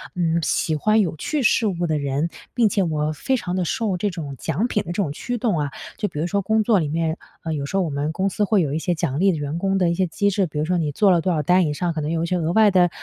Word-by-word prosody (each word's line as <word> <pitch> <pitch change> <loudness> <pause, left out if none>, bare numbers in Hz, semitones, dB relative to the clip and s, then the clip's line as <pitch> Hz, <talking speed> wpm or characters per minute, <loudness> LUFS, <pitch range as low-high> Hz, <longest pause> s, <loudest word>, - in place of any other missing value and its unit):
嗯， 170 -2 +1
喜 160 0 0
欢 215 +8 +2
有 180 -5 -1
趣 290 - -2
事 230 -1 +3
物 175 -3 -1
的 155 -2 0
人， 140 +3 -1 0.2
并 240 -3 +3
且 200 - +1
我 155 -2 -1
非 260 - -1
常 180 -6 -3
的 185 -1 0
受 200 +1 -1
这 205 +3 0
种 155 -7 -6
奖 200 - -1
品 210 -4 -1
的， - - -19
这 - - -2
种 175 -5 -1
驱 245 +11 -4
动 215 -8 0
啊。 145 -1 -2 0.3
就 210 - -1
比 150 - -6
如 160 - 0
说 200 +2 0
工 220 +2 +1
作 215 -2 +3
里 155 - -1
面， 160 +2 -1 0.3
呃， 160 -2 -2
有 145 -2 -3
时 140 - -5
候 195 - +2
我 170 - -2
们 145 +1 -2
公 190 +4 0
司 210 - -1
会 205 -1 +3
有 145 -4 -1
一 155 - 0
些 175 +2 -1
奖 140 -3 -2
励 195 +2 +4
的 165 - -2
员 145 +2 -3
工 195 +2 0
的 180 -3 +2
一 - - +1
些 185 +1 0
机 200 +5 0
制， 195 -1 +1
比 155 - -8
如 150 - 0
说 180 +2 0
你 155 -3 -1
做 195 +7 +3
了 175 -2 +3
多 185 - 0
少 155 -2 0
单 180 +4 +4
以 150 - -1
上， 170 +3 -1
可 160 - -3
能 150 +1 -2
有 165 0 0
一 - - 0
些 180 +2 0
额 165 -1 -1
外 215 0 +5
的， 180 -2 +4
175 Hz, 345 characters per minute, -22 LUFS, 155-200 Hz, 0.3 s, 外